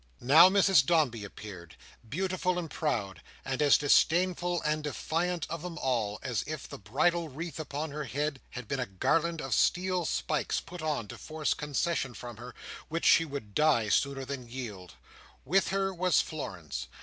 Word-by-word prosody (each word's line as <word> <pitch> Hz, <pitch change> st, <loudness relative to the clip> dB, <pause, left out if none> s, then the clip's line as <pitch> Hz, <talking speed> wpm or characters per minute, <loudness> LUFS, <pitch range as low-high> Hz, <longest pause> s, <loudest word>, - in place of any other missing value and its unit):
Now 155 Hz, +8 st, +8 dB
Mrs 195 Hz, -6 st, +5 dB
Dombey 135 Hz, -8 st, +2 dB
appeared, 95 Hz, -5 st, -10 dB, 0.3 s
beautiful 185 Hz, -, -1 dB
and 165 Hz, -3 st, -4 dB
proud, 100 Hz, -, -2 dB, 0.2 s
and 130 Hz, +2 st, -2 dB
as 145 Hz, -2 st, +6 dB
disdainful 175 Hz, +4 st, +3 dB
and 155 Hz, 0 st, 0 dB
defiant 165 Hz, +3 st, -1 dB
of 165 Hz, 0 st, -5 dB
them 175 Hz, -1 st, -6 dB
all 115 Hz, -8 st, -1 dB
as 125 Hz, -4 st, -1 dB
if 155 Hz, -3 st, -5 dB
the -, -, -9 dB
bridal 160 Hz, -, +1 dB
wreath 160 Hz, +4 st, -6 dB
upon 150 Hz, 0 st, -4 dB
her 150 Hz, 0 st, -4 dB
head 140 Hz, +1 st, -2 dB
had 125 Hz, -3 st, -8 dB
been 135 Hz, -, -2 dB
a 125 Hz, -, -2 dB
garland 165 Hz, -, 0 dB
of 135 Hz, -2 st, -2 dB
steel 180 Hz, +3 st, +2 dB
spikes 155 Hz, 0 st, -1 dB
put 180 Hz, 0 st, -9 dB
on 150 Hz, -8 st, -2 dB
to -, -, -9 dB
force 155 Hz, -1 st, -1 dB
concession 150 Hz, -3 st, -2 dB
from 120 Hz, -2 st, -8 dB
her 120 Hz, +1 st, -10 dB, 0.3 s
which 165 Hz, +2 st, -2 dB
she 165 Hz, -, +6 dB
would 140 Hz, -9 st, -7 dB
die 145 Hz, -7 st, +3 dB
sooner 135 Hz, +3 st, +1 dB
than 130 Hz, -3 st, -6 dB
yield. 105 Hz, -, -7 dB, 0.5 s
With 190 Hz, +8 st, +3 dB
her 195 Hz, 0 st, 0 dB
was 180 Hz, -3 st, +3 dB
Florence. 80 Hz, -, -4 dB
150 Hz, 170 wpm, -30 LUFS, 125-170 Hz, 0.5 s, Now